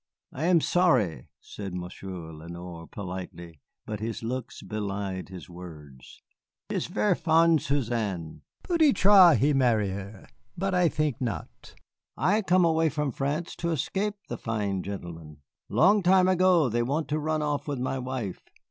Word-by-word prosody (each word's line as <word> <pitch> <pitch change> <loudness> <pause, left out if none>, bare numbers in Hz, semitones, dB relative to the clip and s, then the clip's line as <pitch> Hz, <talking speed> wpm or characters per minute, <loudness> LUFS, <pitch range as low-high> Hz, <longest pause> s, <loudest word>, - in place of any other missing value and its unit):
"I 145 +5 -3
am 175 -2 +4
sorry," 125 - +2
said 95 -3 -7
Monsieur 90 -2 -7
Lenoir, 85 +1 -9
politely, 90 -4 -8 0.2
but 105 -1 -5
his 115 +1 -4
looks 125 +1 -5
belied 100 -3 -4
his 95 -2 -9
words. 75 -7 -12 0.5
"He - - -3
is - - -2
ver' 105 0 +1
fond 165 -2 +3
Suzanne. 110 - -2 0.2
Peut 340 -2 -1
être 200 - +7
he 145 +2 +3
marry 115 -7 +2
her, 100 +1 -8 0.3
but 195 +2 -1
I 180 -2 +4
think 150 -6 -1
not. 115 -5 -5 0.4
I 210 +4 +2
come 185 -2 +3
away 160 -1 +3
from 150 -1 -2
France 145 +7 -3
to 170 - -2
escape 195 +7 -1
the - - -5
fine 105 -4 -2
gentlemen; 85 -6 -8 0.3
long 200 +5 +4
time 185 0 +5
ago 185 -4 +4
they 120 0 0
want 145 +6 -1
to 155 +1 0
run 155 0 -1
off 145 -1 -2
with 145 -2 -2
my 130 +1 -2
wife. 125 -6 -4
125 Hz, 155 wpm, -27 LUFS, -, 0.5 s, être